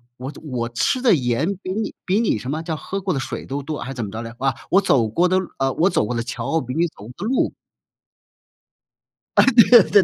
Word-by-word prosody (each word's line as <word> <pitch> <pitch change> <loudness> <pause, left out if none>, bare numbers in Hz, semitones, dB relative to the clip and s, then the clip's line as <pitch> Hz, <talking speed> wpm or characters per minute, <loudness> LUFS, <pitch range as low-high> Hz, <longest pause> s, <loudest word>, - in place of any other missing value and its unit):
我 130 +2 -6
我 120 -5 -3
吃 120 - 0
的 245 -4 +5
盐 125 -2 +1 0.2
比 185 - -4
你 215 +1 -3
比 195 +4 +2
你 225 - +1
什 125 +5 -6
么 155 +3 -2
叫 160 -2 -3
喝 195 +5 -5
过 185 -1 -1
的 135 - -1
水 - - -5
都 140 +2 -4
多 150 +2 -5
还 130 +3 -5
怎 120 -4 -4
么 - - -7
着 110 +2 -5
来？ 115 0 -7
啊， 135 -2 0
我 190 - +5
走 135 - +2
过 170 +11 +2
的 185 +1 +2 0.2
啊 135 0 +1
我 170 +5 +3
走 105 - +1
过 120 +3 -3
的 115 - -1
桥 130 +7 -2
比 125 0 -5
你 170 +4 +2
走 130 - -14
过 - - -11
的 - - -5
路 255 +3 +1 1.9
啊， - - +8
对 245 -4 +6
对 200 0 +4
145 Hz, 255 characters per minute, -21 LUFS, 120-185 Hz, 1.9 s, 啊